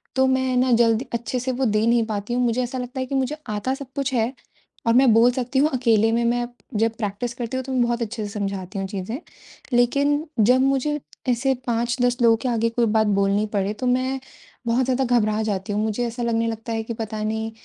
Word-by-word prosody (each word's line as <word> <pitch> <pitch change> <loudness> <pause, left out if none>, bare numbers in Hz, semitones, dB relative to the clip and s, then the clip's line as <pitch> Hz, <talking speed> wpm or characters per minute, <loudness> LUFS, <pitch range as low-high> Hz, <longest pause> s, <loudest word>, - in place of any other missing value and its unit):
तो 265 0 +4
मैं 260 -1 +1
ना 255 0 +3
जल्दी 230 +1 +3
अच्छे 235 +2 -2
से 260 +1 -2
वो 260 +1 -1
दे 215 0 +2
नहीं 235 -1 +3
पाती 210 +1 -3
हूँ। 250 - +1
मुझे 240 +1 +1
ऐसा 250 +2 -4
लगता 250 +1 -5
है 260 - -1
कि 275 - -4
मुझे 265 +3 0
आता 210 +5 -1
सब 270 -1 -8
कुछ 275 -1 -1
है 235 +2 +1 0.5
और 230 - +5
मैं 255 -1 +6
बोल 235 +2 +6
सकती 255 +1 -1
हूँ 300 +2 +4
अकेले 225 -3 +3
में 235 +1 +1
मैं 240 0 +1 0.3
जब 225 0 +3
प्रैक्टिस 215 +2 -3
करती 240 +2 -3
हूँ 260 - -2
तो 265 - -5
मैं 250 - +2
बहुत 240 0 -1
अच्छे 225 -1 -3
से - - -5
समझाती 195 -2 -4
हूँ 195 - -2
चीज़ें। 205 +6 -5 0.5
लेकिन 280 +5 +2
जब 250 +5 +5
मुझे 275 +2 +1 0.3
ऐसे 260 +3 +2
5-10 240 +1 +1
लोगों 230 -1 +5
के 255 - -1
आगे 230 -1 +1
कोई 235 0 +1
बात 220 0 +2
बोलनी 200 +1 +2
पड़े, 200 +1 0
तो 250 +4 -3
मैं 260 +2 +1 0.5
बहुत 240 +2 +2
ज़्यादा 260 +1 +1 0.2
घबरा 215 0 0
जाती 205 -1 -2
हूँ। 210 - 0
मुझे 220 +3 -1
ऐसा 235 +1 -4
लगने 230 0 +1
लगता 225 +1 -4
है 225 0 -2
कि 230 - -5
पता 220 -1 -5
नहीं 220 +1 -2
235 Hz, 230 wpm, -23 LUFS, 220-255 Hz, 0.5 s, मैं